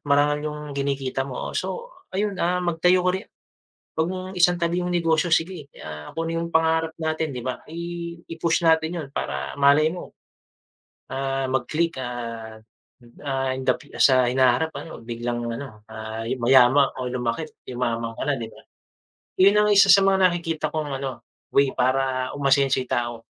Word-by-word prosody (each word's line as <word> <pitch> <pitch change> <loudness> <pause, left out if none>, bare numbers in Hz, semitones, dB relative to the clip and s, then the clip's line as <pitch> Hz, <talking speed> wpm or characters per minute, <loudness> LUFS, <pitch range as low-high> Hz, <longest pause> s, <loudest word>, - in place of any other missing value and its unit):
marangal 145 +1 +2
yung 150 0 -6
kinikita 140 -1 -2
mo. 125 - -5
So, 475 +1 -4 0.2
ayun, 200 0 -2
ah, 180 +1 +2
magtayo 180 +2 +3
ko 180 - +4
ri 190 - -2 0.8
wag 160 - +2
mong 185 0 -5
isantabi 175 -1 +2
yung 180 0 -2
negosyo. 165 0 +2
Sige, 165 -2 0 0.2
ah, 75 -1 -8
kung 165 0 -2
ano 165 - -1
yung 170 - -2
pangarap 160 0 +2
natin, 160 -3 -1
di 125 - -5
ba, 130 0 -3
i 170 +1 -6 0.2
i-push 165 +1 0
natin 160 +1 +3
yun - - -9
para 70 - -3
malay 145 +3 +5
mo, 180 - -9 1.0
ah, 135 0 -2
mag 130 -2 0
click 165 -1 0
at, 115 -3 -6 0.6
ah, 135 -1 0
in 130 0 -5
the - - +4
fu 145 - -18
sa 130 -2 +5
hinaharap 130 +4 +3
ano 165 - -9
biglang 120 +1 -3 0.2
ano, 110 -7 -9
ah, 110 0 -6
yuma 130 +2 +5
o 130 -1 -4
lumaki't 125 +5 -2 0.2
yumaman 115 -2 -2
ka - - -5
na 145 +1 +1
di 115 - -5
ba? - - -16 0.8
Yun 200 +2 +6
ang - - +2
isa 195 -1 +6
sa 195 +2 +7
mga 190 -1 +5
nakikita 165 -3 -2
kong, 145 -4 -3
ano, 135 -1 -5 0.3
way 140 -1 +4
para 130 0 0
umasenso 135 -1 +3
yung 130 - -6
tao. 120 -1 -2
140 Hz, 170 wpm, -24 LUFS, 125-170 Hz, 1.0 s, sa